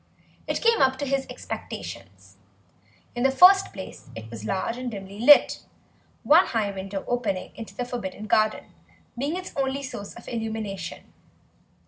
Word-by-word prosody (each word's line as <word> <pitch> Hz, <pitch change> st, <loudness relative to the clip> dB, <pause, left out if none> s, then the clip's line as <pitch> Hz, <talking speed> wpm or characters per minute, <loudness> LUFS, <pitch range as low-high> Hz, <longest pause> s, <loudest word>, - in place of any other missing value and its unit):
It -, -, -2 dB
came 460 Hz, -1 st, +4 dB
up 265 Hz, 0 st, +4 dB
to 285 Hz, -, -3 dB
his 275 Hz, 0 st, -1 dB
expectations. -, -, -8 dB, 0.8 s
In 240 Hz, -, -4 dB
the 270 Hz, -, +4 dB
first 375 Hz, +7 st, +7 dB
place 190 Hz, -1 st, -10 dB
it 110 Hz, 0 st, -9 dB
was 110 Hz, -2 st, -8 dB
large 190 Hz, -, -2 dB
and 250 Hz, 0 st, -4 dB
dimly 200 Hz, -2 st, -8 dB
lit, 285 Hz, +5 st, +6 dB, 0.6 s
one 325 Hz, +5 st, +6 dB
high 215 Hz, -4 st, 0 dB
window 195 Hz, 0 st, -5 dB
opening 220 Hz, -7 st, -2 dB
on 225 Hz, -, -7 dB
to -, -, -16 dB
the 245 Hz, -, -2 dB
forbidden 215 Hz, -4 st, -5 dB
garden 215 Hz, 0 st, +1 dB, 0.4 s
being 285 Hz, +8 st, -2 dB
its 370 Hz, -, -7 dB
only 275 Hz, 0 st, -1 dB
source 205 Hz, -6 st, -7 dB
of 235 Hz, -, -13 dB
illumination. 220 Hz, -4 st, -5 dB
235 Hz, 155 wpm, -25 LUFS, 200-270 Hz, 0.8 s, first